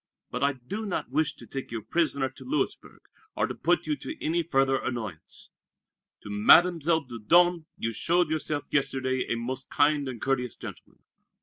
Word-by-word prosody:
But - - -2
I 140 0 +3
do 195 - -6
not 180 - -3
wish 150 +2 +1
to - - -13
take 135 -1 -6
you 115 - -4
a 110 - -7
prisoner 145 -5 0
to 130 - -13
Louisburg, 300 +4 -3 0.3
or - - +1
to - - -4
put - - +1
you 300 - 0
to 315 - -6
any 170 +2 0
further 135 -4 +2
annoyance. 110 -10 -6 0.7
To - - -9
Mademoiselle 160 +8 +5
Dieudonné 165 +9 +3
you 115 0 -2
showed 170 +5 +1
yourself 155 -2 -2
yesterday 130 -2 0
a - - +2
most 130 +3 -4
kind 145 -1 +2
and 125 -3 -6
courteous 125 -2 -1
gentleman. - - -11
140 Hz, 175 wpm, -27 LUFS, 125-165 Hz, 0.7 s, Mademoiselle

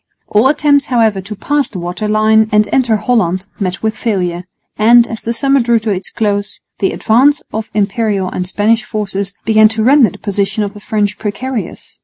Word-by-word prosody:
All 215 +5 +3
attempts, 290 0 +2
however, 225 -6 +1
to 205 +3 -8
pass 290 +7 -1
the 205 - -8
water 175 +4 -4
line 215 +1 +3
and 210 0 +3
enter 245 -4 +2
Holland 195 -5 0
met 185 -1 -3
with 220 0 -1
failure; 180 -6 -2 0.3
and, 235 +2 +5
as 225 -1 -7
the 230 - -3
summer 275 +4 +1
drew 235 -1 +2
to 220 -1 -2
its 190 -1 -2
close, 205 -2 -2 0.2
the 195 - +1
advance 275 +7 +2
of 220 0 -4
Imperial 205 -1 0
and 180 0 -4
Spanish 215 +4 +1
forces 200 -3 -4
began 220 -1 +5
to 220 0 -2
render 260 -2 +5
the - - -13
position 200 +1 -2
of 200 -1 -4
the 205 - -11
French 205 -1 -2
precarious. 225 +3 -5
215 Hz, 190 wpm, -14 LUFS, 200-235 Hz, 0.3 s, and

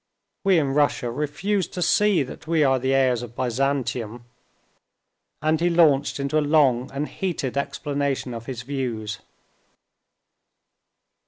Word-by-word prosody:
We 195 -2 +4
in 140 -4 +1
Russia 145 -4 +1
refuse 155 - -1
to 180 - -6
see 205 -2 +3
that 130 - -10
we 160 -2 +3
are 135 -2 +3
the 130 +1 0
heirs 130 -3 +2
of 120 -1 -9
Byzantium," 125 -2 -2 1.2
and 155 +1 +2
he 175 - +3
launched 150 -5 +3
into 140 +3 +1
a - - +1
long 140 -4 +3
and 140 +2 -3
heated 170 -9 -3
explanation 140 -2 -2
of 115 0 -8
his 125 -3 -5
views. 115 -6 -4
140 Hz, 135 wpm, -24 LUFS, 125-155 Hz, 1.2 s, We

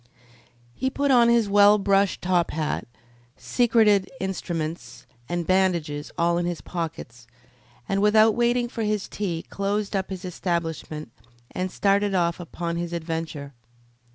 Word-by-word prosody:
He 260 - -1
put 280 +1 0
on 240 -2 +6
his 235 -2 +3
well 205 +1 +6
brushed 195 -1 +1
top 180 -1 +2
hat, 155 -3 -2 0.5
secreted 220 -5 +3
instruments 165 -8 -4 0.2
and 175 -1 -2
bandages 170 -6 0
in - - -21
all 170 0 +2
his 175 -1 -2
pockets, 155 -9 -6 0.6
and 195 0 0
without 215 +1 +5
waiting 240 +1 +1
for 235 - -6
his 210 -2 -1
tea 175 -6 -3
closed 200 +1 -2
up 190 -1 -1
his 190 0 -6
establishment 165 -6 -3 0.4
and 185 +1 -2
started 200 +1 +1
off 170 -1 +1
upon 170 0 -4
his 175 0 -4
adventure. 160 -4 -4
185 Hz, 135 wpm, -24 LUFS, 170-205 Hz, 0.6 s, on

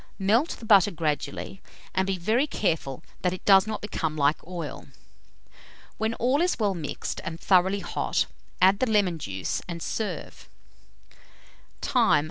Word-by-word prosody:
Melt 220 - +2
the 230 - -10
butter 205 -3 +6
gradually, 160 +2 -3 0.3
and 190 0 +1
be 195 -1 0
very 225 - +1
careful 160 - -2 0.2
that 180 -1 +1
it 185 - -8
does 195 0 +6
not 215 -1 -3
become 160 -6 -3
like 145 +1 +2
oil. 175 -2 -6 1.1
When 220 +1 0
all 260 +6 +2
is 360 +1 +1
well 205 -3 +1
mixed 160 -5 -4
and 160 +1 -5
thoroughly 190 +1 +3
hot, - - 0 0.3
add 190 +2 +5
the 255 - +1
lemon 195 -6 +2
juice, 95 -7 -3
and 170 -1 -5
serve. 185 -2 -5 1.3
Time. - - +3
190 Hz, 145 wpm, -26 LUFS, 165-215 Hz, 1.3 s, butter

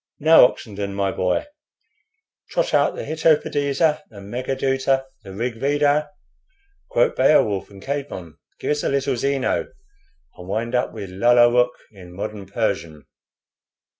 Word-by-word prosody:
Now, 160 -2 +7
Oxenden, 100 -4 -7
my 100 -1 0
boy, 90 -1 0 1.0
trot - - -1
out - - +3
the - - -5
'Hitopadesa,' 155 -1 +1
the 105 - -12
'Megha 120 +7 -4
Dhuta,' 135 0 +1 0.2
the 95 - -10
'Rig 115 +4 -4
Veda.' 145 +2 +1 0.8
Quote 120 - +2
'Beowulf' 130 -8 +3
and 100 -1 -14
Caedmon. 135 - -5 0.3
Gives 150 - -1
us - - -4
a - - +1
little 140 -1 0
Zeno, 135 +2 0 0.7
and 90 - -10
wind 115 +5 -3
up 125 0 0
with 95 -2 -8
'Lalla 120 +4 +5
Rookh' 125 0 +2
in 90 -4 -13
modern 100 0 -6
Persian." 85 -8 -3
120 Hz, 135 wpm, -22 LUFS, 100-140 Hz, 1.0 s, Now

